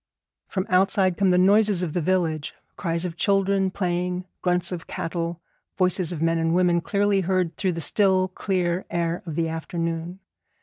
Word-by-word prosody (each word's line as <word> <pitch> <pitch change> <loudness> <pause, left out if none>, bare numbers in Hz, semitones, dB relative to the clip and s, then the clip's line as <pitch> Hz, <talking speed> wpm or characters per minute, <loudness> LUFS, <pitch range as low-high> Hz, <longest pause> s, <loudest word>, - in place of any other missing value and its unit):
From 190 -1 -2
outside 185 0 +3
come 195 0 +2
the 180 - +4
noises 200 0 +4
of 160 -4 -3
the 175 - 0
village, 160 -4 -1 0.2
cries 170 0 -1
of 170 -1 -5
children 195 -1 +2
playing, 180 -1 -2 0.2
grunts 180 0 +1
of 175 -2 -6
cattle, 170 0 -4 0.4
voices 180 -2 +2
of 165 -2 -3
men 165 0 +2
and 165 +1 +1
women 175 -1 +3
clearly 200 +2 +1
heard 180 -3 0
through 185 0 -1
the 165 - -4
still 190 +1 +3
clear 185 -1 -1
air 170 0 -1
of 160 - -4
the 165 0 0
afternoon. 165 +1 -4
180 Hz, 170 wpm, -24 LUFS, 165-190 Hz, 0.4 s, the